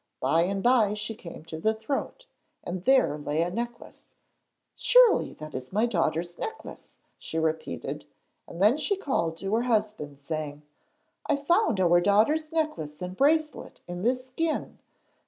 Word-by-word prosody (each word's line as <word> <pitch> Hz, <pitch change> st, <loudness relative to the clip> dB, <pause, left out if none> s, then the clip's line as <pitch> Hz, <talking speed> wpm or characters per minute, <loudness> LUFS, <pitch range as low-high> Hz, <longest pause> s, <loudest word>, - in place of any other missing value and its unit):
By 160 Hz, +6 st, +2 dB
and 195 Hz, +1 st, -2 dB
by 230 Hz, -5 st, +4 dB
she 210 Hz, +1 st, -4 dB
came 170 Hz, -6 st, -11 dB
to 160 Hz, -1 st, -7 dB
the 220 Hz, +6 st, +1 dB
throat, 275 Hz, -, -4 dB, 0.4 s
and 175 Hz, +1 st, -5 dB
there 260 Hz, -, +4 dB
lay 150 Hz, +2 st, 0 dB
a 175 Hz, -, -3 dB
necklace. 235 Hz, +3 st, -7 dB, 0.6 s
'Surely -, -, +5 dB
that 155 Hz, 0 st, -9 dB
is 130 Hz, 0 st, -6 dB
my 215 Hz, +4 st, +2 dB
daughter's 175 Hz, -5 st, -1 dB
necklace,' 445 Hz, 0 st, -7 dB, 0.2 s
she 160 Hz, -, -5 dB
repeated, 160 Hz, -, -2 dB, 0.4 s
and 170 Hz, -, -9 dB
then 220 Hz, +7 st, +5 dB
she 400 Hz, +5 st, 0 dB
called 170 Hz, -, -1 dB
to 195 Hz, +3 st, -3 dB
her 225 Hz, -, +3 dB
husband, 215 Hz, -, -1 dB
saying: 150 Hz, 0 st, -5 dB, 0.7 s
'I -, -, +4 dB
found 280 Hz, -, +2 dB
our 175 Hz, -1 st, +4 dB
daughter's 225 Hz, -, +2 dB
necklace 305 Hz, -, -2 dB
and 180 Hz, 0 st, -5 dB
bracelet 305 Hz, +5 st, +1 dB
in 175 Hz, 0 st, -5 dB
this 255 Hz, +4 st, 0 dB
skin. 315 Hz, +5 st, -3 dB
205 Hz, 155 wpm, -27 LUFS, 165-260 Hz, 0.7 s, Surely